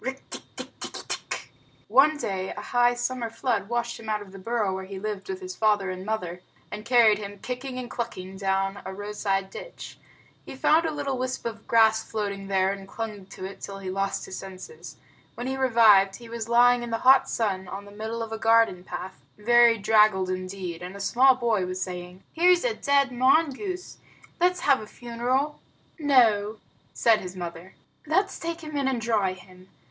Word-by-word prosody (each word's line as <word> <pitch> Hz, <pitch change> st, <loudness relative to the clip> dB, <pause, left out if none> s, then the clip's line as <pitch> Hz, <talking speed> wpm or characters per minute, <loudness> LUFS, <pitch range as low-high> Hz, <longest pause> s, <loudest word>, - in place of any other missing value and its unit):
One 300 Hz, +3 st, +5 dB
day, 190 Hz, -8 st, -3 dB
a -, -, -3 dB
high 245 Hz, 0 st, +2 dB
summer 240 Hz, -1 st, -2 dB
flood 225 Hz, -3 st, -2 dB
washed 235 Hz, 0 st, -2 dB
him 220 Hz, -, -8 dB
out 210 Hz, -1 st, -1 dB
of 195 Hz, -, -15 dB
the 195 Hz, -, -10 dB
burrow 215 Hz, -1 st, -1 dB
where 190 Hz, 0 st, -5 dB
he 195 Hz, 0 st, -8 dB
lived 210 Hz, -, -5 dB
with 380 Hz, 0 st, -4 dB
his 370 Hz, 0 st, -7 dB
father 205 Hz, -3 st, +2 dB
and 185 Hz, 0 st, -6 dB
mother, 180 Hz, -4 st, -3 dB, 0.3 s
and 210 Hz, -, -6 dB
carried 230 Hz, -3 st, +5 dB
him, 205 Hz, -1 st, -7 dB
kicking 255 Hz, +4 st, -5 dB
and 250 Hz, -1 st, -5 dB
clucking, 190 Hz, -6 st, -6 dB
down 195 Hz, 0 st, -1 dB
a 190 Hz, -, -7 dB
roadside 200 Hz, -1 st, -2 dB
ditch. -, -, -9 dB, 0.4 s
He -, -, -9 dB
found 315 Hz, +5 st, +3 dB
a -, -, -1 dB
little 280 Hz, -3 st, -3 dB
wisp 255 Hz, -1 st, -3 dB
of 225 Hz, -1 st, -6 dB
grass 220 Hz, -1 st, +4 dB
floating 200 Hz, -3 st, -4 dB
there, 190 Hz, -1 st, +2 dB
and 195 Hz, -1 st, -7 dB
clung 210 Hz, -2 st, -6 dB
to 190 Hz, -1 st, -8 dB
it 195 Hz, -, -9 dB
till 195 Hz, -, -6 dB
he 190 Hz, -1 st, -5 dB
lost 195 Hz, +1 st, -2 dB
his 185 Hz, -, -7 dB
senses. 190 Hz, -, -10 dB, 0.4 s
When 240 Hz, -, -5 dB
he 265 Hz, +1 st, -2 dB
revived, 225 Hz, -7 st, +5 dB
he 235 Hz, -, -11 dB
was 230 Hz, -1 st, -5 dB
lying 245 Hz, +1 st, +5 dB
in 240 Hz, -, -5 dB
the 225 Hz, -, -1 dB
hot 265 Hz, +1 st, +6 dB
sun 190 Hz, -4 st, -1 dB
on 195 Hz, +2 st, -7 dB
the 205 Hz, -, -13 dB
middle 220 Hz, +2 st, -4 dB
of 225 Hz, -, -7 dB
a 225 Hz, -, -4 dB
garden 225 Hz, -5 st, +3 dB
path, 185 Hz, 0 st, -7 dB, 0.2 s
very 235 Hz, +2 st, +5 dB
draggled 210 Hz, -3 st, +3 dB
indeed, 185 Hz, -2 st, -5 dB
and 180 Hz, +2 st, -7 dB
a -, -, -8 dB
small 255 Hz, +6 st, +4 dB
boy 225 Hz, -7 st, 0 dB
was 185 Hz, 0 st, -4 dB
saying, 180 Hz, 0 st, -6 dB
"Here's 355 Hz, +1 st, +4 dB
a -, -, +1 dB
dead 280 Hz, -6 st, +2 dB
mongoose. 315 Hz, +8 st, +1 dB, 0.4 s
Let's 360 Hz, +1 st, +2 dB
have 275 Hz, -4 st, +3 dB
a 215 Hz, -, -9 dB
funeral." 245 Hz, +6 st, -2 dB, 0.4 s
"No," 225 Hz, -8 st, +3 dB, 0.3 s
said 225 Hz, -2 st, +3 dB
his 185 Hz, 0 st, -7 dB
mother, 175 Hz, +1 st, -7 dB, 0.3 s
"let's 380 Hz, +6 st, +1 dB
take 335 Hz, 0 st, -4 dB
him 305 Hz, -2 st, -7 dB
in 280 Hz, -2 st, 0 dB
and 260 Hz, -3 st, 0 dB
dry 215 Hz, -5 st, +1 dB
him. 185 Hz, 0 st, -16 dB
220 Hz, 185 wpm, -26 LUFS, 195-255 Hz, 0.4 s, hot